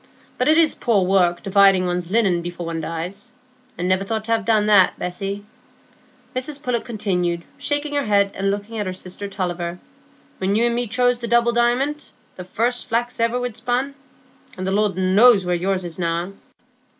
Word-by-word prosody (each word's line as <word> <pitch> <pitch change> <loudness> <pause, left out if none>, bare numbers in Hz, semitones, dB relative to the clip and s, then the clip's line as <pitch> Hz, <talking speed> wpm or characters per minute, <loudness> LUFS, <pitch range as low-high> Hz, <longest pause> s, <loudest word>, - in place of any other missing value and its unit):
But 250 - +1
it's 315 0 +5
poor 205 -6 +1
work 180 -2 +2
dividing 195 -2 +4
one's 180 -1 -2
linen 195 -5 +2
before 175 0 -6
one 165 -1 -3
dies,—I 250 +8 -8
niver 185 +1 +1
thought 220 +2 -3
to 230 0 +2
ha' 225 - -3
done 215 -2 +2
that, 205 -3 +5
Bessy," 195 +3 -5 0.9
Mrs 280 +3 -4
Pullet 245 -3 -1
continued, 180 -7 -2
shaking 290 0 -2
her 285 -1 0
head 200 -2 +2
and 195 +1 -1
looking 205 +3 -4
at 205 - -2
her 185 - -3
sister 185 +2 -6
Tulliver, 175 -3 -4 0.6
"when 190 +2 0
you 230 +2 +3
and 240 - +1
me 240 0 -1
chose 245 +3 +1
the 235 - -5
double 235 0 +3
diamont, 250 +6 0 0.3
the 180 - -7
first 235 +8 -2
flax 240 +1 -1
iver 230 +2 +1
we'd 245 -3 -4
spun, 255 +3 -1 0.6
and 185 - -4
the 190 - -1
Lord 205 -2 +1
knows 195 +2 +5
where 180 - 0
yours 185 +2 -1
is 170 -2 -7
gone." 170 +2 -3
205 Hz, 180 wpm, -21 LUFS, 185-240 Hz, 0.9 s, it's